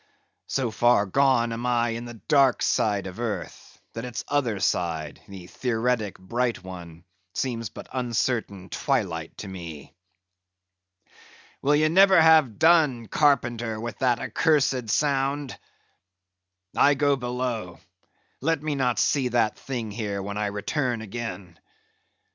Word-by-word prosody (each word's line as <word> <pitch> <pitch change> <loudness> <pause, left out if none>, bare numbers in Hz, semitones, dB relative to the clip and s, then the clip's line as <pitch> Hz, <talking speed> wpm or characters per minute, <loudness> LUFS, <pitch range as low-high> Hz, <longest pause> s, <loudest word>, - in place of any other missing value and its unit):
So 130 -4 -1
far 120 -1 +3
gone 120 +1 +2
am 120 +2 -3
I 120 -1 +2
in 115 +1 -4
the 120 -1 -8
dark 135 +2 +3
side 105 -3 +1
of 95 +3 -8
earth, 105 -8 -5
that 115 - -5
its 125 -3 -5
other 125 -8 0
side, 80 -5 -1
the 95 -3 -10
theoretic 115 0 -1
bright 115 +3 -2
one, 85 -3 -10 0.3
seems 115 -4 -2
but - - -11
uncertain 115 -6 -2
twilight 80 -1 -2
to 105 - -7
me. 85 -6 -9 1.7
Will 145 +2 +3
ye 155 +1 +3
never 190 +2 +6
have 160 -8 +5
done, 155 -8 +4
Carpenter, 120 -6 +1
with 120 +1 -6
that 125 -2 +2
accursed 135 -7 +1
sound? 140 +1 0 1.2
I 145 0 +5
go 145 0 +2
below; 125 -7 -3 0.6
let 155 +1 0
me 155 -1 -1
not 125 -5 0
see 135 +4 +2
that 120 -3 +1
thing 120 -5 -5
here 105 -2 -3
when 100 +1 -5
I 105 0 -1
return 115 +4 -2
again. 100 -6 -7
120 Hz, 130 wpm, -25 LUFS, 100-135 Hz, 1.7 s, never